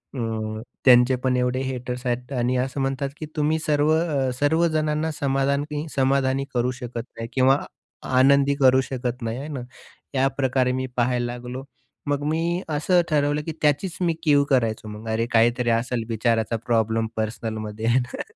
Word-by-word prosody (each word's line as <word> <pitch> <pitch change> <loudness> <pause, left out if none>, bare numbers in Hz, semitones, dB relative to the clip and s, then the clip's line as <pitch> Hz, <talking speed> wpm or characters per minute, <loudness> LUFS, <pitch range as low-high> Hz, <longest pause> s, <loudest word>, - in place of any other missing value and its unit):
हं, 110 -3 -3 0.2
त्यांचे 125 0 +6
पण 130 -1 +2
एवढे 125 +1 0
हेटर्स 125 -1 -4
आहेत 125 +1 -2
आणि 125 +1 +1
असं 135 +1 -4
म्हणतात 135 +1 -1
की 155 - -4
तुम्ही 155 +1 +1
सर्व 150 -1 +2
अ, 155 -5 +1
सर्वजणांना 155 0 +1
समाधान 140 -1 0 0.3
समाधानी 135 0 +1
करू 125 0 +1
शकत 125 -2 -6
नाही 115 0 -4
किंवा 135 +1 +4 0.6
आनंदी 140 +2 +5
करू 130 -2 +5
शकत 125 -1 -4
नाही, 115 0 -3
आहे 140 - -6
ना. 145 -4 -5 0.5
याप्रकारे 130 -1 +1
मी - - -2
पाहायला 120 0 +1
लागलो. 125 +2 -7 0.4
मग 145 0 0
मी 170 +3 0
असं 160 +4 +2
ठरवलं 145 -1 +1
की 165 - -3
त्याचीच 150 +5 +1
मी 170 -2 +2
कीव 145 -3 +4
करायचो 115 -5 +1
मग 105 +1 -8
अरे 110 +1 0
काहीतरी 120 +1 +3
असेल 115 +1 0
विचाराचा 115 0 0
प्रॉब्लेम 115 -1 +1
पर्सनलमध्ये 110 0 -4
आहे 120 +2 +4
ना. 125 -1 -5
130 Hz, 155 wpm, -24 LUFS, 120-145 Hz, 0.6 s, त्यांचे